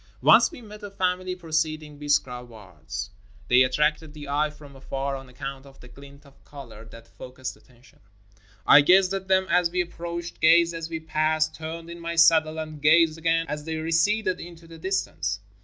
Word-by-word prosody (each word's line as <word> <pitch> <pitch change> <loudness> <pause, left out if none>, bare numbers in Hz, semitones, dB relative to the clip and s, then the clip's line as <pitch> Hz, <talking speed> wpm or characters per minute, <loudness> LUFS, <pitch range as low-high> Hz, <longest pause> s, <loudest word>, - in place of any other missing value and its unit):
Once - - +6
we 325 -7 -12
met 210 0 -12
a 205 - -7
family 185 -1 -2
proceeding 155 -3 -3
Biskra 135 -4 0
wards. 100 - -9 0.4
They 125 +1 +6
attracted 150 +4 0
the 145 -2 -9
eye 150 +2 +1
from 150 -2 -15
afar 135 +1 -4
on 135 -1 -10
account 135 +1 -8
of 135 0 -18
the 125 - -14
glint 140 +3 -15
of 140 -1 -21
color 120 -6 -12
that 115 +1 -14
focused 130 0 -8
attention. 125 0 -23 0.7
I 145 - +8
gazed 185 +5 +4
at 190 -1 -4
them 190 0 +3
as 180 -1 +3
we 180 +1 0
ap 175 - -15
proached, 170 0 -7
gazed 170 +1 +5
as 165 0 -6
we 160 -1 -4
passed, 155 0 0
turned 165 +1 -7
in 170 - -9
my 170 0 -5
saddle 160 -1 +4
and 155 -2 -7
gazed 160 +1 +4
again 165 0 +1
as 150 0 -5
they 160 0 -4
receded 180 +5 +1
into 170 -1 -11
the 165 0 -13
distance. 160 - -2
155 Hz, 190 wpm, -25 LUFS, 135-170 Hz, 0.7 s, I